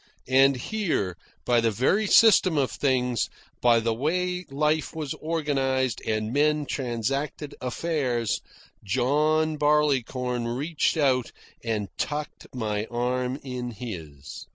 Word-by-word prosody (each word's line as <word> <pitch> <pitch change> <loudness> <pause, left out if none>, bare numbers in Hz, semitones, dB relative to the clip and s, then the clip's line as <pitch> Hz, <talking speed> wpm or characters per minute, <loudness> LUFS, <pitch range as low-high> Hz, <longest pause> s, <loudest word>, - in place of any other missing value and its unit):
And 135 +1 +6
here, 130 - -2 0.3
by 120 -1 +3
the 115 - +2
very 135 - +1
system 195 -7 +6
of 135 -3 +1
things, 125 -4 0 0.3
by 120 -1 +5
the 115 0 0
way 180 +8 -1
life 150 +3 0
was 155 -4 -3
organised 135 -6 -1
and 110 +1 -1
men 150 +1 +2
transacted 135 +4 -3
affairs, 125 -4 -1 0.4
John 150 +8 +1
Barleycorn 130 -5 +1
reached 145 +8 0
out 130 -5 +2 0.3
and 110 -3 -1
tucked 150 0 -4
my 105 -4 -2
arm 125 +2 -1
in 125 -2 -4
his. 85 - -8
130 Hz, 115 wpm, -26 LUFS, 120-150 Hz, 0.4 s, And